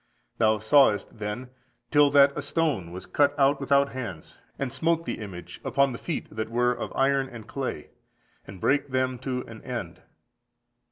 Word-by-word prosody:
Thou 110 Hz, -1 st, +4 dB
sawest, 110 Hz, -1 st, +3 dB
then, 105 Hz, +5 st, -5 dB, 0.4 s
till 145 Hz, -1 st, +6 dB
that 140 Hz, 0 st, +5 dB
a 150 Hz, -, -2 dB
stone 145 Hz, -, -1 dB
was 90 Hz, +2 st, -7 dB
cut 145 Hz, -1 st, +2 dB
out 140 Hz, 0 st, +3 dB
without 140 Hz, 0 st, +3 dB
hands, 115 Hz, -11 st, -7 dB, 0.2 s
and 135 Hz, -3 st, -3 dB
smote 165 Hz, 0 st, +1 dB
the -, -, -4 dB
image 95 Hz, -5 st, -8 dB
upon 140 Hz, -1 st, +2 dB
the 120 Hz, -, -6 dB
feet 165 Hz, -, -3 dB
that 110 Hz, 0 st, -3 dB
were 120 Hz, +1 st, +2 dB
of -, -, -5 dB
iron 135 Hz, 0 st, +2 dB
and 115 Hz, -3 st, -10 dB
clay, 130 Hz, -, -5 dB, 0.6 s
and 95 Hz, -1 st, -10 dB
brake 140 Hz, +8 st, +2 dB
them 130 Hz, -1 st, 0 dB
to 125 Hz, 0 st, -3 dB
an 110 Hz, -1 st, -11 dB
end. 115 Hz, -9 st, -6 dB
130 Hz, 170 wpm, -26 LUFS, 110-140 Hz, 0.6 s, till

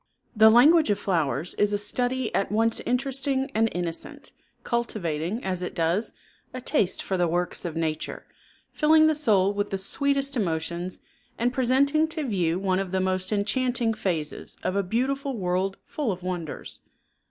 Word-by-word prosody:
The 220 Hz, +1 st, +7 dB
language 295 Hz, +6 st, +6 dB
of 205 Hz, -, +2 dB
flowers 165 Hz, -3 st, -1 dB
is 205 Hz, 0 st, +3 dB
a -, -, +2 dB
study 245 Hz, +4 st, -1 dB
at 195 Hz, -, 0 dB
once 225 Hz, +2 st, +1 dB
interesting 270 Hz, +2 st, 0 dB
and 225 Hz, +1 st, +2 dB
innocent, 170 Hz, -2 st, -5 dB, 0.3 s
cultivating, 205 Hz, -4 st, -2 dB
as 185 Hz, -1 st, -2 dB
it 180 Hz, -, -5 dB
does, 170 Hz, +6 st, 0 dB, 0.4 s
a -, -, -3 dB
taste 245 Hz, -, 0 dB
for 190 Hz, -, -2 dB
the 175 Hz, -1 st, +2 dB
works 175 Hz, +2 st, -2 dB
of 165 Hz, -2 st, -4 dB
nature, 160 Hz, -1 st, -3 dB, 0.5 s
filling 315 Hz, 0 st, +5 dB
the 315 Hz, -, +4 dB
soul 205 Hz, -10 st, +2 dB
with 205 Hz, 0 st, -2 dB
the 195 Hz, -, -2 dB
sweetest 275 Hz, +7 st, +1 dB
emotions 170 Hz, -3 st, -2 dB, 0.4 s
and 245 Hz, +2 st, 0 dB
presenting 280 Hz, +4 st, +2 dB
to 320 Hz, -1 st, -2 dB
view 180 Hz, -, 0 dB
one 190 Hz, -1 st, 0 dB
of 195 Hz, -2 st, -3 dB
the 190 Hz, -, 0 dB
most 185 Hz, 0 st, 0 dB
enchanting 225 Hz, +3 st, 0 dB
phases 170 Hz, -8 st, -4 dB
of 185 Hz, -, -1 dB
a 200 Hz, -, +2 dB
beautiful 260 Hz, +6 st, -1 dB
world 185 Hz, +1 st, -1 dB
full 285 Hz, -8 st, -2 dB
of 185 Hz, -1 st, -6 dB
wonders. 175 Hz, -4 st, -5 dB
205 Hz, 165 wpm, -26 LUFS, 180-255 Hz, 0.5 s, The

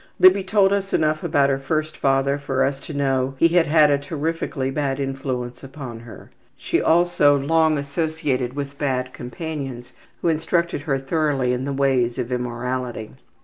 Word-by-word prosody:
'' -, -, -40 dB
Libby 185 Hz, +1 st, +6 dB
told 195 Hz, 0 st, +3 dB
us 195 Hz, -1 st, -2 dB
enough 155 Hz, 0 st, +1 dB
about 140 Hz, -1 st, +2 dB
her 135 Hz, -, 0 dB
first 155 Hz, +2 st, -2 dB
father 135 Hz, 0 st, +1 dB
for 135 Hz, -2 st, 0 dB
us 135 Hz, 0 st, -2 dB
to 155 Hz, -, -10 dB
know 135 Hz, -2 st, 0 dB
he 165 Hz, -, +4 dB
had 170 Hz, -1 st, +3 dB
had 150 Hz, -1 st, +5 dB
a 140 Hz, -, +2 dB
terrifically 145 Hz, -2 st, -3 dB
bad 140 Hz, -1 st, -1 dB
influence 135 Hz, -3 st, -4 dB
upon 135 Hz, -4 st, -8 dB
her. 115 Hz, -1 st, -13 dB, 0.3 s
She -, -, 0 dB
also 160 Hz, -4 st, +4 dB
long 160 Hz, +2 st, +2 dB
associated 140 Hz, -3 st, -2 dB
with 140 Hz, 0 st, -6 dB
bad 130 Hz, -3 st, -1 dB
companions 135 Hz, -2 st, -6 dB, 0.3 s
who -, -, +1 dB
instructed 165 Hz, 0 st, 0 dB
her 135 Hz, -, +2 dB
thoroughly 135 Hz, -2 st, 0 dB
in 125 Hz, +1 st, -2 dB
the 140 Hz, -, -2 dB
ways 135 Hz, -3 st, +1 dB
of 125 Hz, -1 st, -3 dB
immorality. 125 Hz, -1 st, -3 dB
140 Hz, 170 wpm, -22 LUFS, 130-155 Hz, 0.3 s, Libby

